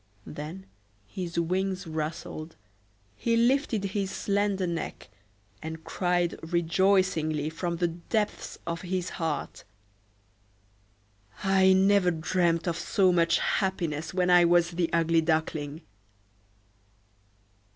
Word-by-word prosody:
Then 155 Hz, +6 st, -7 dB, 0.4 s
his 170 Hz, -, -4 dB
wings 190 Hz, +2 st, -1 dB
rustled, 155 Hz, 0 st, -5 dB, 0.6 s
he 230 Hz, -, +1 dB
lifted 240 Hz, -2 st, +2 dB
his 195 Hz, 0 st, -2 dB
slender 200 Hz, -1 st, 0 dB
neck, 170 Hz, -2 st, -5 dB, 0.5 s
and 160 Hz, 0 st, -7 dB
cried 175 Hz, -1 st, 0 dB
rejoicingly 170 Hz, -2 st, +1 dB
from 170 Hz, +1 st, -3 dB
the 175 Hz, 0 st, +1 dB
depths 205 Hz, +6 st, -3 dB
of 170 Hz, 0 st, -3 dB
his 185 Hz, -1 st, -2 dB, 2.4 s
heart,—"I 190 Hz, -1 st, +5 dB
never 190 Hz, -1 st, +4 dB
dreamed 170 Hz, +1 st, 0 dB
of 170 Hz, -1 st, 0 dB
so 190 Hz, -4 st, +2 dB
much 170 Hz, -1 st, +3 dB
happiness 170 Hz, -6 st, -1 dB
when 180 Hz, -1 st, +1 dB
I 175 Hz, 0 st, +7 dB
was 175 Hz, 0 st, +4 dB
the 170 Hz, -1 st, -1 dB
Ugly 165 Hz, 0 st, +3 dB
Duckling!" 155 Hz, -1 st, -1 dB
175 Hz, 100 wpm, -28 LUFS, 165-190 Hz, 2.4 s, I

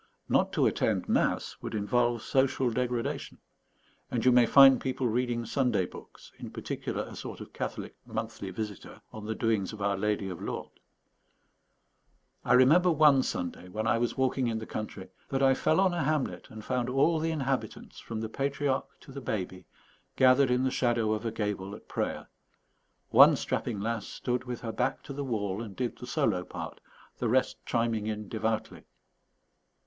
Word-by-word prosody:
Not -, -, +2 dB
to -, -, +3 dB
attend -, -, +1 dB
mass -, -, +1 dB
would -, -, -5 dB
involve 120 Hz, +2 st, +1 dB
social 130 Hz, -2 st, +1 dB
degradation; 125 Hz, 0 st, -2 dB, 0.7 s
and 120 Hz, -1 st, -2 dB
you 130 Hz, -, +7 dB
may 120 Hz, -1 st, +5 dB
find 135 Hz, -2 st, +8 dB
people 130 Hz, -1 st, -1 dB
reading 120 Hz, 0 st, -1 dB
Sunday 115 Hz, -5 st, +1 dB
books, -, -, -13 dB
in -, -, -7 dB
particular -, -, -4 dB
a -, -, -10 dB
sort -, -, -7 dB
of -, -, -10 dB
Catholic -, -, -5 dB
Monthly 110 Hz, -3 st, -4 dB
Visitor 105 Hz, 0 st, -6 dB
on 110 Hz, -1 st, -8 dB
the 110 Hz, -, -2 dB
doings 110 Hz, -3 st, 0 dB
of 110 Hz, -, -9 dB
Our 100 Hz, 0 st, +1 dB
Lady 105 Hz, 0 st, -1 dB
of 90 Hz, -3 st, -6 dB
Lourdes. -, -, -5 dB, 1.7 s
I 125 Hz, -, +2 dB
remember 150 Hz, +9 st, +6 dB
one 150 Hz, -4 st, +5 dB
Sunday, 90 Hz, -4 st, -4 dB
when 110 Hz, +4 st, -3 dB
I 115 Hz, -, +2 dB
was 120 Hz, +2 st, -1 dB
walking 130 Hz, -1 st, +1 dB
in 115 Hz, -1 st, -1 dB
the 110 Hz, -, -5 dB
country, 105 Hz, -4 st, -6 dB, 0.2 s
that 135 Hz, 0 st, 0 dB
I 135 Hz, 0 st, +6 dB
fell 155 Hz, +5 st, +2 dB
on 190 Hz, -2 st, +3 dB
a 175 Hz, -, -1 dB
hamlet 150 Hz, -1 st, -1 dB
and 110 Hz, -1 st, -10 dB
found 125 Hz, -1 st, -1 dB
all 145 Hz, +5 st, +3 dB
the 165 Hz, +1 st, 0 dB
inhabitants, 135 Hz, -4 st, -3 dB
from 110 Hz, -1 st, -5 dB
the 110 Hz, -, -2 dB
patriarch 135 Hz, +2 st, -1 dB
to -, -, -13 dB
the 140 Hz, +1 st, -7 dB
baby, 95 Hz, -6 st, -4 dB, 0.5 s
gathered 130 Hz, +1 st, +5 dB
in 125 Hz, +1 st, +2 dB
the 130 Hz, -, +1 dB
shadow 120 Hz, -4 st, +1 dB
of 110 Hz, +2 st, -2 dB
a -, -, -2 dB
gable 105 Hz, -2 st, -3 dB
at -, -, -15 dB
prayer. -, -, -3 dB, 0.8 s
One -, -, +8 dB
strapping 110 Hz, -4 st, -2 dB
lass 115 Hz, 0 st, -2 dB
stood 125 Hz, 0 st, -3 dB
with 125 Hz, -1 st, -5 dB
her 115 Hz, -, -4 dB
back 110 Hz, -, -1 dB
to 140 Hz, -, -7 dB
the 140 Hz, +1 st, -4 dB
wall 105 Hz, -5 st, -2 dB
and 105 Hz, -4 st, -8 dB
did 125 Hz, -2 st, -3 dB
the 125 Hz, -, -8 dB
solo 110 Hz, -, +1 dB
part, -, -, -8 dB, 0.4 s
the -, -, 0 dB
rest -, -, +1 dB
chiming 115 Hz, -2 st, 0 dB
in 105 Hz, -1 st, -4 dB
devoutly. 110 Hz, 0 st, -2 dB
120 Hz, 180 wpm, -29 LUFS, 110-130 Hz, 1.7 s, find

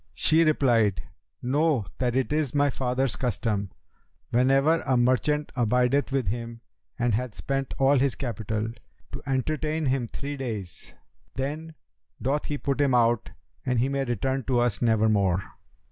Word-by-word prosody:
She 160 Hz, +1 st, +4 dB
replied, 115 Hz, -, +2 dB, 0.4 s
'Know 140 Hz, -2 st, +2 dB
that 125 Hz, -2 st, 0 dB
it 130 Hz, +2 st, 0 dB
is 150 Hz, -3 st, 0 dB
my 145 Hz, -1 st, +3 dB
father's 125 Hz, 0 st, -1 dB
custom, 105 Hz, -5 st, -1 dB, 0.6 s
whenever 135 Hz, +6 st, +3 dB
a 130 Hz, -2 st, +1 dB
merchant 130 Hz, +5 st, +1 dB
abideth 125 Hz, +3 st, +2 dB
with 135 Hz, -2 st, 0 dB
him 115 Hz, +2 st, -4 dB, 0.4 s
and 120 Hz, -1 st, +1 dB
hath 120 Hz, +1 st, -2 dB
spent 135 Hz, -1 st, -2 dB
all 135 Hz, 0 st, +4 dB
his 135 Hz, -1 st, +1 dB
capital, 110 Hz, -3 st, -3 dB, 0.4 s
to -, -, -6 dB
entertain 155 Hz, +4 st, -1 dB
him 130 Hz, -3 st, 0 dB
three 140 Hz, +4 st, -6 dB
days; 105 Hz, -, -5 dB, 0.4 s
then 155 Hz, +4 st, -4 dB, 0.4 s
doth 140 Hz, +3 st, -1 dB
he 145 Hz, -, -2 dB
put 140 Hz, 0 st, -1 dB
him 135 Hz, -3 st, +3 dB
out 120 Hz, -2 st, +2 dB, 0.3 s
and 125 Hz, -2 st, 0 dB
he 125 Hz, +4 st, +2 dB
may 140 Hz, 0 st, 0 dB
return 130 Hz, +2 st, -1 dB
to 125 Hz, -3 st, +2 dB
us 120 Hz, -5 st, 0 dB
nevermore. 105 Hz, -5 st, +2 dB
130 Hz, 145 wpm, -26 LUFS, 115-140 Hz, 0.6 s, She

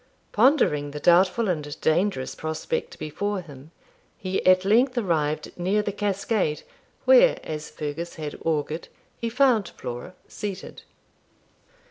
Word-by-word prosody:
Pondering 210 Hz, -, +3 dB
the 150 Hz, +1 st, -6 dB
doubtful 185 Hz, +7 st, +4 dB
and 150 Hz, -4 st, -3 dB
dangerous 160 Hz, -4 st, +1 dB
prospect 155 Hz, 0 st, -4 dB
before 200 Hz, +6 st, -3 dB
him, 145 Hz, -3 st, -13 dB, 0.5 s
he 185 Hz, 0 st, -2 dB
at 185 Hz, 0 st, +5 dB
length 245 Hz, +5 st, +3 dB
arrived 155 Hz, -8 st, 0 dB
near 195 Hz, +4 st, +1 dB
the 205 Hz, -, -2 dB
cascade, 200 Hz, -4 st, -1 dB, 0.4 s
where, -, -, +6 dB
as 155 Hz, -1 st, -5 dB
Fergus 155 Hz, +3 st, -5 dB
had 150 Hz, -2 st, -5 dB
augured, 155 Hz, 0 st, -1 dB, 0.3 s
he 230 Hz, -, -2 dB
found 245 Hz, -4 st, +3 dB
Flora 125 Hz, +9 st, -7 dB
seated. 195 Hz, -2 st, -6 dB
185 Hz, 120 wpm, -25 LUFS, 150-210 Hz, 0.5 s, where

